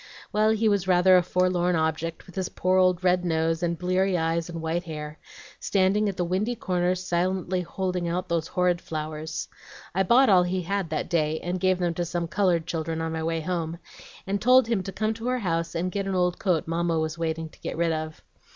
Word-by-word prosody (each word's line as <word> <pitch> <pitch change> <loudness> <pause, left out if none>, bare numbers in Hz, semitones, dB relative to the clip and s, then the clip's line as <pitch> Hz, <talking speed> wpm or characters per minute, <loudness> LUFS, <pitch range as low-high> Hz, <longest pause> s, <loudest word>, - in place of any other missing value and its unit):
Well, 215 +1 +3
he 220 0 +2
was 200 -3 +1
rather 185 0 +5
a 180 - +6
forlorn 180 0 +1
object, 160 +1 -2
with 180 - -14
his 185 0 -3
poor 185 +1 +1
old 185 -1 +3
red 180 0 +3
nose, 165 -1 0
and 170 -1 -1
bleary 185 +1 +1
eyes, 165 +1 -1
and 170 -1 -5
white 165 +2 -2
hair, 150 -1 -7 0.4
standing 200 +2 +2
at 195 - -5
the 175 - 0
windy 200 +7 -1
corners 180 -2 -1
silently 185 +1 0
holding 180 0 -3
out 180 +2 -2
those 170 -2 -1
horrid 180 -1 +1
flowers. 155 0 -5 0.5
I 190 - +1
bought 240 +8 +5
all 185 -5 +6
he 180 +1 -1
had 195 -1 -2
that 155 -1 -2
day, 160 -2 0
and 180 +1 -3
gave 185 0 +2
them 175 -2 0
to 175 - -2
some 170 0 -2
colored 175 -2 +1
children 165 -1 -3
on 160 0 -2
my 160 0 -3
way 165 0 -1
home, 165 -1 -3 0.5
and 200 +1 -2
told 255 +2 +6
him 230 -4 +1
to 195 - -6
come 215 +3 -1
to 225 +2 -6
our 255 0 +1
house 165 -6 -2
and 180 +2 -1
get 195 0 -2
an 195 - -1
old 180 -1 +1
coat 180 -7 0
Mamma 165 0 0
was 160 +1 -2
waiting 160 -1 -2
to - - -21
get - - -5
rid 170 0 +1
of. 155 0 -4
175 Hz, 220 wpm, -26 LUFS, 165-185 Hz, 0.5 s, a